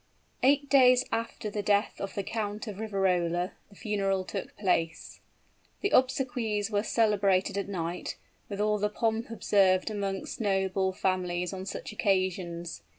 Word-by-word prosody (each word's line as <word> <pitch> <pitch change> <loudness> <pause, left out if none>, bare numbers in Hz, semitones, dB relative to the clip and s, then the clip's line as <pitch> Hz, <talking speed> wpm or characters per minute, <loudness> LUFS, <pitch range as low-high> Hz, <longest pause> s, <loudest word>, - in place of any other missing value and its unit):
Eight 285 +2 +4
days 255 -3 +6
after 225 -2 -3
the 205 - -2
death 205 0 +1
of 195 - -5
the 200 - -1
Count 210 0 -3
of 210 -3 -7
Riverola, 180 -4 0 0.2
the 200 - -18
funeral 195 -2 -1
took 195 0 -6
place. 165 -5 -1 0.6
The 400 - 0
obsequies 245 -5 +1
were 205 -1 +2
celebrated 200 -5 +2
at 200 0 -2
night, 175 -2 -4 0.3
with 200 -1 -5
all 210 0 +2
the 210 +1 +1
pomp 225 +1 -1
observed 195 -3 +2
amongst 200 +1 -3
noble 190 -2 +1
families 180 -1 -1
on 190 0 -6
such - - -5
occasions. 185 -4 -1
200 Hz, 145 wpm, -29 LUFS, 185-215 Hz, 0.6 s, days